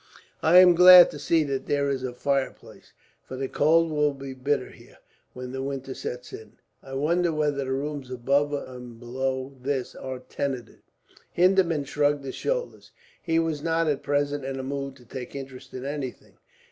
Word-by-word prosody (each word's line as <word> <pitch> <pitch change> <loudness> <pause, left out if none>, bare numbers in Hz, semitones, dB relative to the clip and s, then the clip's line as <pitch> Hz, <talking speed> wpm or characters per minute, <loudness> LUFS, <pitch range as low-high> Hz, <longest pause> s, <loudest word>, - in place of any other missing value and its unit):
"I 165 +3 +5
am 180 -1 +9
glad 180 0 +9
to - - -8
see 165 -2 +2
that 140 -2 -3
there 140 -1 +1
is 135 -2 -2
a 130 -1 -3
fireplace, 135 +2 -3 0.3
for 130 - -9
the 135 +1 -3
cold 165 +4 +3
will 150 -1 +1
be 135 -1 -7
bitter 130 0 -1
here, - - -18 0.4
when 125 0 -7
the 130 0 -4
winter 135 -1 -4
sets 125 -1 -7
in. 110 - -10 0.3
I 135 0 -9
wonder 170 +5 +1
whether 150 -2 0
the 135 -1 -2
rooms 140 -1 -3
above 140 +4 +1
and 125 -4 -7
below 130 +2 -3
this 135 -1 -2
are 130 -1 -6
tenanted?" 130 -1 -5 0.5
Hindeman 175 -4 +3
shrugged 145 0 0
his 135 - -5
shoulders. - - -4 0.3
He 165 -2 0
was 165 -3 0
not, 165 +1 +1
at 145 -2 0
present, 145 0 -1
in 135 0 -4
a - - -4
mood 140 0 -4
to 125 -2 -18
take 125 +2 -8
interest 135 -2 -9
in 130 +1 -6
anything. 140 -3 -6
140 Hz, 180 wpm, -26 LUFS, 130-150 Hz, 0.5 s, am